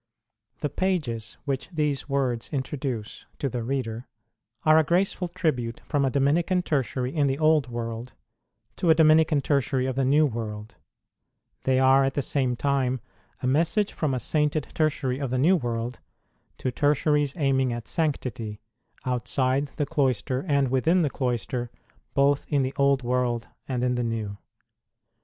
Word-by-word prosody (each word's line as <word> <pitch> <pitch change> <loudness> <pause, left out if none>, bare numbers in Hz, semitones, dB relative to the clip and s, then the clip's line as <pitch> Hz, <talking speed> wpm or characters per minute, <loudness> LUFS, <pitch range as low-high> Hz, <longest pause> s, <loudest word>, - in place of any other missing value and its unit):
IJHE 145 -1 -2
pages 125 - -1
which 135 -2 -2
these 150 -5 -1
words 130 -4 0
introduce 130 -5 -4
to 140 - -1
the 125 -1 -3
reader 120 -1 -3 0.6
are 155 0 +6
a - - +4
graceful 180 +3 +1
tribute 130 -9 -2
from 145 -3 0
a 135 - +2
Dominican 160 +7 +2
Tertiary 130 -3 -1
in 145 -2 +3
the 135 0 0
Old 155 -4 +3
World 115 +1 -5 0.6
to 175 - +1
a 160 - +7
Dominican 155 -1 +5
Tertiary 135 -2 +1
of 130 -1 -2
the 135 - +1
New 145 +4 +4
World; 110 -4 -5 0.9
they 130 -1 +3
are 130 +1 +5
at 135 0 0
the 140 - 0
same 130 -3 0
time 130 -1 0 0.4
a - - 0
message 170 +10 +2
from 145 -5 -1
a - - -1
sainted 150 +3 0
Tertiary 140 -4 0
of 140 -3 -2
the 130 - 0
New 165 +9 +5
World 120 -4 -3 0.6
to 130 - -2
Tertiaries 145 0 +2
aiming 135 -4 +2
at 120 -1 -5
sanctity, 125 - -2 0.5
outside 130 +2 0
the 150 - 0
cloister 130 -4 0
and 140 -3 +2
within 160 +8 +3
the 145 - 0
cloister, 120 -1 -2 0.5
both 140 0 +3
in 145 -3 +2
the 130 +1 -2
Old 140 -2 +3
World 120 -1 0 0.2
and 125 -2 -1
in 125 0 +2
the 120 0 -1
New. 110 -3 -3
135 Hz, 155 wpm, -26 LUFS, 125-150 Hz, 0.9 s, a